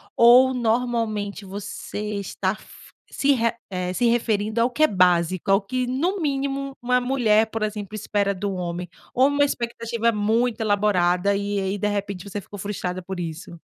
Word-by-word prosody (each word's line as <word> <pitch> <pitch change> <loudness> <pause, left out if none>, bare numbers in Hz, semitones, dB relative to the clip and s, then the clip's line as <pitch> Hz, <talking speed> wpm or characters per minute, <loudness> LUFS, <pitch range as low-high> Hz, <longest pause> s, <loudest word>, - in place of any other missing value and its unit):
ou 250 +2 +7
normalmente 225 -4 -1
você 205 +1 -5
estar 200 - -2
f - - -16 0.2
se 285 0 +1
re 230 -2 +1 0.2
eh, 180 0 -2
se 245 - 0
referindo 225 -1 +1
ao 240 - +3
que 305 +5 0
é - - +7
básico, 180 -1 +2
ao 195 +1 +5
que, 250 +5 -2
no 340 +10 0
mínimo, 275 -1 -2
uma 250 +1 +2
mulher, 225 -4 +3
por 225 -1 -3
exemplo, 210 -1 -4
espera 205 -1 0
do 200 +1 -3
homem? 180 0 -4 0.3
Ou 260 +2 +4
uma 285 0 +2
expectativa 235 -2 -1
muito 225 +3 0
elaborada, 200 -2 +2
e 200 0 -1
aí, 195 +1 -2
de 210 - -1
repente, 200 -3 -3
você 205 - -4
ficou 205 - -11
frustrada 185 -2 -4
por 190 +1 -6
isso? 170 +1 -6
210 Hz, 170 wpm, -23 LUFS, 195-240 Hz, 0.3 s, ou